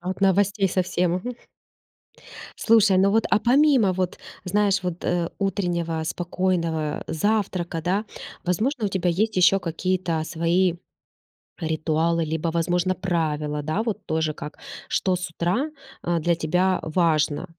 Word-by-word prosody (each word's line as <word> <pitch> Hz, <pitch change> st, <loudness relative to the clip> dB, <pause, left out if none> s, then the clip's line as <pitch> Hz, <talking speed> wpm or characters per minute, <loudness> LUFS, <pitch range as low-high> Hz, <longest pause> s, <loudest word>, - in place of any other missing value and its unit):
От 185 Hz, +2 st, -4 dB
новостей 195 Hz, 0 st, +3 dB
совсем. 180 Hz, -1 st, 0 dB
Мгм. 245 Hz, +7 st, -5 dB, 1.2 s
Слушай, 215 Hz, -4 st, +4 dB
ну 195 Hz, +1 st, +4 dB
вот, 225 Hz, +2 st, +2 dB
а -, -, +5 dB
помимо, 250 Hz, -3 st, +4 dB
вот, 185 Hz, -1 st, -2 dB, 0.3 s
знаешь, 200 Hz, +1 st, +1 dB
вот, 180 Hz, -1 st, -4 dB
э, 175 Hz, -1 st, 0 dB
утреннего 175 Hz, -5 st, -1 dB
спокойного 170 Hz, -2 st, -1 dB
завтрака, 180 Hz, -3 st, -1 dB
да, 190 Hz, +6 st, 0 dB, 0.4 s
возможно, 220 Hz, -, 0 dB
у -, -, 0 dB
тебя 185 Hz, -2 st, 0 dB
есть 210 Hz, +5 st, 0 dB
ещё 185 Hz, +2 st, +5 dB
какие-то 175 Hz, -1 st, -1 dB
свои 170 Hz, +3 st, +1 dB, 0.9 s
ритуалы, 160 Hz, +1 st, 0 dB
либо, 160 Hz, +1 st, -2 dB
возможно, 175 Hz, +2 st, +1 dB
правила, 155 Hz, -5 st, -1 dB
да, 155 Hz, +8 st, -1 dB
вот 215 Hz, -3 st, -3 dB
тоже 160 Hz, -1 st, 0 dB
как, 150 Hz, +1 st, -8 dB, 0.3 s
что 185 Hz, -, +1 dB
с 180 Hz, -1 st, -5 dB
утра, 185 Hz, -, -1 dB, 0.3 s
а, 170 Hz, 0 st, 0 dB
для 170 Hz, +1 st, +1 dB
тебя 180 Hz, +4 st, +1 dB
важно? 160 Hz, -1 st, +1 dB
180 Hz, 135 wpm, -24 LUFS, 165-195 Hz, 1.2 s, а